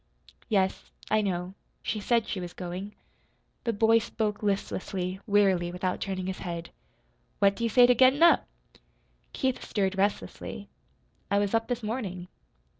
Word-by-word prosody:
"Yes, 190 -3 0 0.2
I 215 0 +4
know, 180 -2 -2 0.3
she 215 - -2
said 230 +2 +1
she 195 - -3
was 175 -1 -6
going." 185 +3 -6 0.7
The 230 - +2
boy 225 +2 +4
spoke 215 -2 -2
listlessly, 190 -2 -2
wearily, 195 -4 +3
without 180 +1 -2
turning 190 -2 -3
his 190 0 -4
head. 170 -2 -5 0.7
"What 200 0 +4
do 235 - -5
you 230 - +2
say 245 +2 +7
to 250 - +6
gettin' 260 +5 +5
up?" 340 -4 +6 0.8
Keith 260 -1 -1
stirred 195 -2 -1
restlessly. 200 +1 -2 0.6
"I 200 - +2
was 205 0 +1
up 225 0 +1
this 245 -2 -3
morning." 195 -6 -4
200 Hz, 150 wpm, -28 LUFS, 185-225 Hz, 0.8 s, say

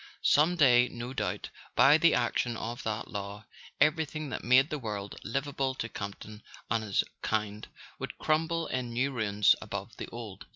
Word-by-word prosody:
Some 160 +5 +4
day, 125 -6 +6
no 120 +2 -6
doubt, 135 - -3 0.2
by 145 +3 +7
the 170 0 +5
action 120 -1 0
of 120 +3 -5
that 110 -2 -3
law, 100 +1 -6 0.3
everything 155 0 +1
that - - -5
made 130 +4 +5
the 150 - -2
world 105 -4 -5
livable 135 +1 -2
to 115 - -3
Campton 105 +1 -7 0.3
and 115 0 +1
his 100 -3 +1 0.2
kind 105 -1 -2 0.3
would - - -6
crumble 165 +1 +1
in 125 -2 -3
new 130 +4 0
ruins 105 -4 +3
above 100 +1 -6
the - - -5
old. 115 -4 -9
120 Hz, 165 wpm, -30 LUFS, 105-140 Hz, 0.3 s, by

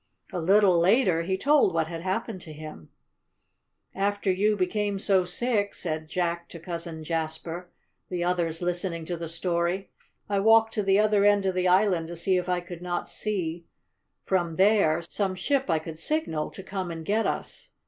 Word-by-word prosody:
A 180 - -1
little 190 +1 +4
later 185 -2 +3
he 190 +3 -1
told 280 - +3
what 160 -1 +2
had 165 0 -6
happened 190 +2 -3
to 155 - -10
him. 155 - -10 1.0
"After 200 0 0
you 210 +3 +2
became 200 +2 0
so 195 -2 +2
sick," 205 +2 0
said 155 -2 -3
Jack 170 0 -2
to 170 - -9
Cousin 170 -2 -5
Jasper, 165 +2 -4 0.4
the 180 -1 -2
others 175 -2 -1
listening 175 -1 -2
to 175 - -3
the 165 -1 -6
story, 170 +2 -1 0.4
"I 200 -1 0
walked 225 +2 +5
to 210 - 0
the 195 -1 +3
other 210 -1 +3
end 205 -1 +4
of 190 - +1
the 185 0 +1
island 180 -3 +3
to 170 - -7
see 185 +3 +1
if 180 0 -2
I 180 -1 +1
could 175 -1 -9
not 175 0 -3
see, 175 -5 -3 0.6
from 175 -4 0
there, 190 -4 +3
some 195 -1 -1
ship 270 +6 0
I 165 - +3
could 160 0 -7
signal 165 - -1
to 195 - -10
come 190 -2 -4
and 165 -1 -6
get 215 +4 +1
us. - - -4
180 Hz, 180 wpm, -27 LUFS, 170-200 Hz, 1.0 s, walked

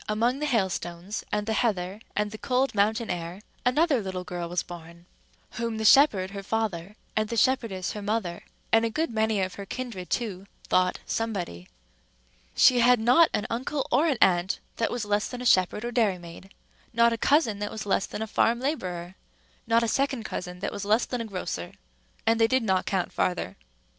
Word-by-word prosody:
among 235 +5 +1
the 300 - -1
hailstones, 190 -4 -2
and 210 0 -1
the 220 - -1
heather, 200 -4 0 0.2
and 210 0 0
the 215 - -7
cold 260 +1 +1
mountain 220 +3 +1
air, 170 +1 -5 0.2
another 280 0 +3
little 185 -2 -4
girl 175 -1 -5
was 175 0 -1
born, 170 0 -11 0.5
whom 230 -1 -3
the 220 - -2
shepherd 210 -8 +5
her 200 0 -6
father, 205 -3 -2 0.2
and 215 -1 0
the 230 - -3
shepherdess 225 -6 +1
her 210 - -6
mother, 200 -4 -2 0.3
and 225 0 +5
a 230 - +1
good 315 +5 -1
many 220 -2 +1
of 185 -1 -2
her 200 - -7
kindred 230 -8 -6
too, 200 -5 -3 0.2
thought 185 0 +2
Somebody. 185 - -3 0.9
She 250 -1 +6
had 245 0 +5
not 250 +9 +5
an 210 - -1
uncle 260 +4 -2
or 285 +7 +4
an 280 -6 +1
aunt 180 0 +2 0.2
that 225 - +1
was 240 -3 -3
less 205 0 0
than 250 - -7
a 250 - -6
shepherd 190 +1 +3
or 240 - -3
dairymaid, 190 -6 -1 0.4
not 235 0 +4
a - - 0
cousin, 255 -8 +2
that 205 0 -2
was 215 -1 -6
less 195 -1 +1
than 220 - -4
a - - -5
farm 230 +2 +2
laborer, 185 - -3 0.5
not 230 +1 +3
a - - +1
second 270 0 0
cousin 180 -3 -6
that 200 - -2
was 205 - -5
less 215 +4 +2
than 250 -2 -3
a - - -4
grocer, 180 - -5 0.5
and 225 0 +3
they 225 - +6
did 260 +1 +2
not 190 -3 +1
count 190 -3 -1
farther. 175 - -1
215 Hz, 195 wpm, -27 LUFS, 185-235 Hz, 0.9 s, She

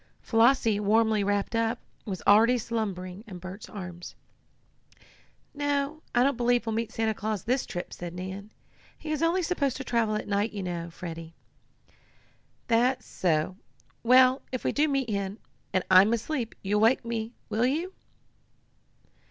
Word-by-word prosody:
Flossie, 225 -2 +3
warmly 215 0 +3
wrapped 205 +2 0
up, 230 +1 +1 0.3
was 195 -5 -5
already 225 +5 +6
slumbering 200 -5 -4
in 190 -4 -8
Bert's 185 +3 -9
arms. 180 -3 -8 1.4
"No, 290 +1 -1
I 245 - +5
don't 275 -2 +2
believe 245 -1 +2
we'll 225 - -1
meet 230 0 -2
Santa 220 -1 0
Claus 215 -2 -3
this 255 +3 0
trip," 175 -2 -5
said 175 0 -7
Nan. 190 +3 -6 0.5
"He 310 - -6
is 305 - -1
only 340 +3 +2
supposed 285 -7 0
to 265 - -5
travel 230 -4 +1
at 210 - -3
night, 205 +2 0
you 200 -2 -4
know, 170 -2 -4
Freddie." 165 -1 -8 1.3
"That's 245 +3 +2
so. 170 +1 0 0.4
Well, 255 +2 +5
if 255 - -3
we - - +1
do 300 +2 +2
meet 275 -3 0
him, 200 0 -2 0.3
and 185 -1 +1
I'm 190 +4 +7
asleep, 235 0 -2
you 205 +2 +1
wake 230 +3 +3
me 230 -1 -2
up: - - -18 0.2
will 230 +3 +2
you?" 330 +8 -2
225 Hz, 155 wpm, -28 LUFS, 195-255 Hz, 1.4 s, I'm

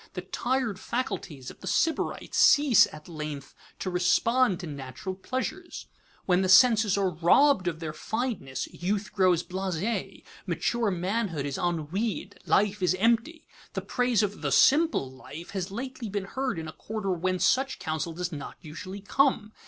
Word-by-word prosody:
The 180 - -4
tired 235 +2 -2
faculties 180 - -4
of - - -17
the - - -9
Sybarite 325 -1 0
cease 285 -6 +6
at 150 0 -12
length 150 -4 -6 0.2
to 185 - -3
respond 190 +4 +2
to - - -6
natural 140 +4 -6
pleasures. 260 - -5 0.4
When 180 0 +3
the 185 - 0
senses 215 0 +6
are 195 -2 +1
robbed 180 - +4
of 165 -2 -2
their 160 -2 -5
fineness, 215 - -3
youth 200 +3 -2
grows 185 -4 +3
blasé, 190 +3 -3 0.2
mature 235 -3 0
manhood 185 -4 -2
is 140 -2 -3
ennuied, 180 +5 -2
life 205 0 +2
is 185 0 +2
empty. 235 - +1 0.3
The - - -2
praise 245 -4 +1
of 205 0 -3
"the 145 -3 -1
simple 275 - +4
life" 150 +6 -10
has 190 -1 -3
lately 240 +2 -6
been 200 -1 -3
heard 260 -1 -3
in 160 -1 -5
a - - -8
quarter 215 -3 -4
whence 185 +1 0
such 265 0 +2
counsel 160 +1 -3
does 180 +1 -4
not 145 -3 -7
usually 185 +5 -8
come. 215 -1 +1
190 Hz, 160 wpm, -27 LUFS, 170-230 Hz, 0.4 s, cease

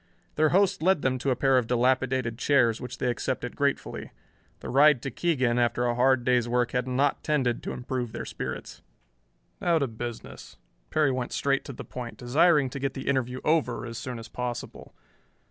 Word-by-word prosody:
Their 155 0 +3
host 195 +1 +2
led 185 -2 +2
them 130 -1 +1
to 135 - -1
a 130 - +2
pair 135 0 +3
of 115 - -4
dilapidated 125 -1 +1
chairs, 120 -5 +3
which 125 -1 -7
they 125 - 0
accepted 125 0 -3
gratefully. 140 -1 -2 0.5
The - - -6
ride 140 +1 +5
to 135 - -3
Keegan 130 -8 +1
after 120 0 +1
a 120 - +1
hard 125 0 +3
day's 125 -2 +2
work 120 0 +1
had 125 0 -1
not 135 +3 +1
tended 130 -6 0
to - - -5
improve 125 -2 -4
their - - -5
spirits. - - -6 0.8
"Now 170 -2 +3
to 145 - +1
business." 115 0 -8 0.3
Perry 150 -3 +2
went 125 -1 -3
straight 140 -1 +1
to 140 - -7
the - - -9
point, 120 -2 -7
desiring 140 +2 +3
to 140 - -5
get 135 -1 -2
the 135 - -6
interview 130 -2 0
over 150 -6 +1
as 115 0 -6
soon 125 -1 -5
as 115 0 -9
possible. 125 0 -6
130 Hz, 190 wpm, -27 LUFS, 120-140 Hz, 0.8 s, ride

